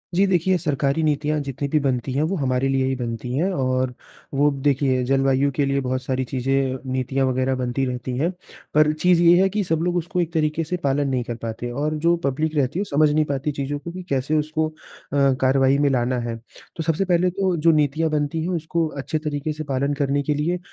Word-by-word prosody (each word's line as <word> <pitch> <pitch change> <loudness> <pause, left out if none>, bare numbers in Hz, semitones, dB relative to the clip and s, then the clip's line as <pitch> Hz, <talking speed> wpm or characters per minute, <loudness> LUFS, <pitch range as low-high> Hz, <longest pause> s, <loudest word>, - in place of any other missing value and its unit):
जी 195 - +4
देखिए, 185 0 +2
सरकारी 145 -1 0
नीतियाँ 150 0 +1
जितनी 140 +1 -4
भी 155 - +2
बनती 130 -2 -1
हैं, 140 - +1
वो 185 +5 0
हमारे 135 -3 0
लिए 135 -1 +1
ही 130 0 0
बनती 120 0 -4
हैं 180 +5 +1
और 130 -1 0 0.4
वो 145 +2 +3
देखिए, 135 -2 +1
जलवायु 135 +1 +2
के 145 - +2
लिए 140 0 +1
बहुत 130 0 -2
सारी 130 0 -1
चीज़ें, 130 +1 0
नीतियाँ 130 +1 0
वग़ैरह 130 +1 0
बनती 130 +1 -1
रहती 125 0 -4
हैं। 165 +5 +1 0.4
पर 150 0 +5
चीज़ 175 +2 +3
ये 175 +2 +6
है 190 - +3
कि 210 +1 -1
सब 160 -2 0
लोग 175 0 0
उसको 175 +1 -1
एक 165 -1 -3
तरीके 155 0 0
से 180 +3 -3
पालन 140 +1 +1
नहीं 125 -2 0
कर 120 0 -5
पाते 115 +2 -4
और 150 +4 -1
जो 170 0 +5
पब्लिक 155 +3 -1
रहती 145 +5 0
है 205 - -1
समझ 150 +1 +4
नहीं 155 +1 +2
पाती 140 +1 -2
चीज़ों 145 +1 -3
को 170 +4 -7
कि 185 +1 -7
कैसे 140 +3 0
उसको 155 +1 0
अ, - - -16 0.7
कार्रवाई 135 +1 +3
में 145 -1 +3
लाना 125 -1 0
है। 120 -1 -3 0.4
तो 165 - -3
सबसे 165 +5 0
पहले 180 0 +2
तो 185 -1 0
जो 165 +2 +4
नीतियाँ 155 +1 +1
बनती 150 +1 -1
हैं, 180 - -2
उसको 165 -1 -1
अच्छे 145 +1 -3
तरीके 150 0 -3
से 155 +1 -6
पालन 140 0 -1
करने 140 0 0
के 150 +1 0
लिए 170 +5 -1
145 Hz, 225 wpm, -22 LUFS, 130-160 Hz, 0.7 s, ये